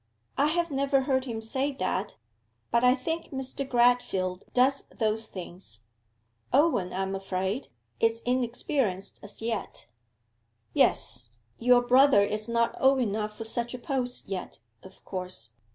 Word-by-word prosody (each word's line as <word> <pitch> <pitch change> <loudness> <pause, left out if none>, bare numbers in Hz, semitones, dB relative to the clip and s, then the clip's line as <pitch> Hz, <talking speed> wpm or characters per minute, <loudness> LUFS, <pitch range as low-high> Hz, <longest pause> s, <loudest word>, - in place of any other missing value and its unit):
'I 285 - +3
have 340 +1 0
never 275 0 +2
heard 260 -1 +1
him 225 -3 -4
say 265 +6 -1
that; 190 -3 -2 0.6
but 235 +1 +3
I 250 +1 +6
think 325 +6 -3
Mr. 265 0 -4
Gradfield 240 -7 +2
does 265 +2 +3
those 220 -1 -1
things. 175 - -7 0.7
Owen, 265 - +3
I 190 +1 -1
am 190 0 -3
afraid, 195 +5 -2 0.3
is 225 0 +2
inexperienced 245 -4 -1
as 205 +2 -8
yet.' 225 -3 -4 0.9
'Yes; 120 +1 +1 0.3
your 245 +1 +5
brother 255 -3 +6
is 215 +2 -2
not 235 0 +1
old 270 +1 +5
enough 210 -2 -1
for - - -4
such 235 +2 -3
a - - -5
post 250 -1 -2
yet, 190 -2 -5 0.2
of 190 - -16
course. 180 - -3
235 Hz, 140 wpm, -28 LUFS, 195-265 Hz, 0.9 s, I